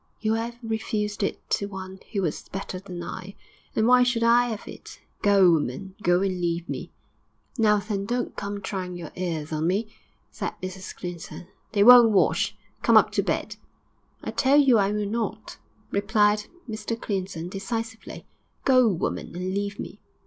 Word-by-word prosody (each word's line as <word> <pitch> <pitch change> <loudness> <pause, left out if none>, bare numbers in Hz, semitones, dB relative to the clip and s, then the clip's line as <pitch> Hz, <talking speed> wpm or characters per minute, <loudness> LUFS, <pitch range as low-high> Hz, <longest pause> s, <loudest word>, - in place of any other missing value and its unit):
You 220 0 +1
'ave 235 +1 -3
refused 215 -2 -2
it 200 - -2
to 200 - +1
one 190 -1 -8
who 200 -3 -1
was 160 - -3
better 195 -1 -5
than 180 -2 -7
I; 190 +3 -7 0.4
and 220 - +2
why 250 +1 +6
should 245 -2 +2
I 240 +1 +4
'ave 220 - -6
it? - - -12 0.2
Go, 195 -3 +6
woman; 160 +4 -1
go 175 0 +3
and 185 -2 -1
leave 170 0 -1
me.' - - -5 0.7
'Now, 210 -1 +5
then, 200 -1 -3
don't 245 +1 -2
come 200 0 -4
trying 185 -3 -4
your 170 -3 -8
airs 165 -4 -3
on 155 +1 0
me,' 210 +4 -1 0.4
said - - -4
Mrs 185 0 -7
Clinton. 175 -1 -8 0.2
'They 200 -2 +4
won't 240 0 +10
wash. 200 -3 +2 0.2
Come - - +6
up - - +5
to - - +1
bed.' - - -2 0.7
'I - - -3
tell 275 +1 +3
you 260 -6 +5
I 200 0 +2
will 210 0 -1
not,' 220 0 -4 0.3
replied 210 0 +2 0.2
Mr 220 +1 -4
Clinton, 185 -6 -3
decisively. 225 +4 -5 0.4
'Go, 255 -2 +6
woman, 175 -3 -2
and 185 +1 -3
leave 200 0 -3
me!' - - -7
200 Hz, 170 wpm, -25 LUFS, 185-225 Hz, 0.7 s, won't